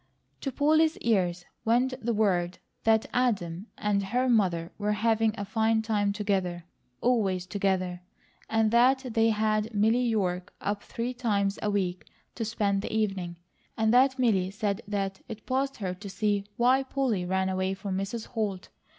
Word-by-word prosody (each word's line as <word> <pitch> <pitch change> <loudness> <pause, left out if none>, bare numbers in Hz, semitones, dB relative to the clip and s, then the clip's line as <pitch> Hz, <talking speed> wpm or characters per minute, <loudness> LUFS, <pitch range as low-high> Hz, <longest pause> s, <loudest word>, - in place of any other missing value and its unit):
To 275 - -3
Polly's 310 +4 +3
ears 180 -6 0 0.2
went 245 +3 +2
the 235 - +1
word 185 -5 +1 0.3
that 220 -1 +4
Adam 200 -7 0
and 205 -2 +1
her 245 +7 0
mother 180 -8 +2
were 210 0 +1
having 225 +1 +2
a 200 - -3
fine 220 +1 +1
time 205 -2 +1
together, 190 -4 -1 0.4
always 200 -7 +1
together; 185 -2 -1 0.5
and 225 -1 +2
that 260 +3 +4
they 225 0 +4
had 215 0 +1
Milly 220 +4 +3
York 190 -7 -1
up 205 0 -2
three 240 +2 -4
times 205 -5 0
a 210 - 0
week 185 -3 -1 0.3
to 230 - -4
spend 205 -3 0
the - - -5
evening; 195 -5 -1 0.4
and 220 0 +2
that 260 +2 +5
Milly 205 -8 +2
said 205 +1 -2
that 195 -2 -2
it 220 -2 -8
passed 270 +1 -1
her 185 -4 -3
to 200 +2 -9
see 205 0 0
why 255 +3 +4
Polly 260 -7 -1
ran 190 +1 0
away 190 0 -1
from 190 0 -4
Mrs. 195 +4 -3
Holt. 210 -6 -3
210 Hz, 160 wpm, -28 LUFS, 190-230 Hz, 0.5 s, that